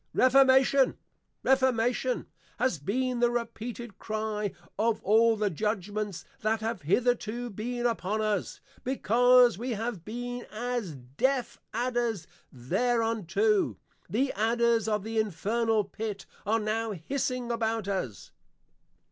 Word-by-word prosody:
REFORMATION! 265 +1 +5 0.5
REFORMATION! 255 -1 +2 0.3
has 235 - +1
been 250 - -1
the 240 0 +4
repeated 235 -1 -5
Cry 215 -2 -2 0.3
of 225 0 +2
all 225 +2 +5
the 210 -2 0
Judgments 210 +1 -3
that 220 0 0
have 225 +1 -2
hitherto 240 +6 0
been 240 +4 -3
upon 215 -3 0
us; 210 -3 -1 0.2
because 245 -2 +4
we 245 +1 -2
have 220 -4 -4
been 245 +3 -5
as 230 -6 -3
deaf 145 - -1
Adders 235 -5 -1 0.3
thereunto, 215 - +1 0.3
the 255 +9 0
Adders 230 +1 +2
of 210 -2 0
the 225 +1 -1
Infernal 215 +3 +1
Pit 205 0 -5 0.2
are 225 +2 +3
now 220 +1 -1
hissing 250 - -2
about 225 -2 -1
us. 185 - -4
225 Hz, 115 wpm, -29 LUFS, 210-245 Hz, 0.5 s, REFORMATION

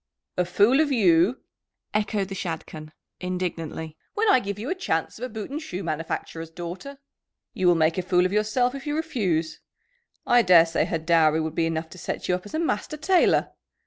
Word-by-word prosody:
"A 180 - +1
fool 205 +9 +4
of 310 -2 +2
you!" 190 -1 +3 0.5
echoed 205 -2 0
the - - -5
Shadchan 160 -4 -6 0.3
indignantly, 170 -3 -4 0.2
"when 440 +2 +1
I - - +6
give 200 -2 -5
you 220 +5 -6
a - - +3
chance 165 - -2
of 250 - -3
a - - -6
boot 220 +1 -7
and 300 +3 -4
shoe 195 - -5
manufacturer's 165 0 -4
daughter. 175 +12 -7 0.6
You 185 - 0
will 175 - +6
make 160 +2 +2
a - - +1
fool 180 0 +2
of 185 - -1
yourself 215 +4 +1
if 275 +1 -8
you 295 - -1
refuse. 200 - -1 0.7
I 245 0 +5
daresay 170 -4 +5
her 165 - -1
dowry 160 -1 +3
would 160 -1 -2
be 165 0 +1
enough 160 0 -3
to 185 - -11
set - - -4
you - - +2
up 180 +3 -3
as 205 - -7
a - - 0
master 305 -1 -2
tailor. 355 +4 +3
185 Hz, 200 wpm, -25 LUFS, 165-245 Hz, 0.7 s, I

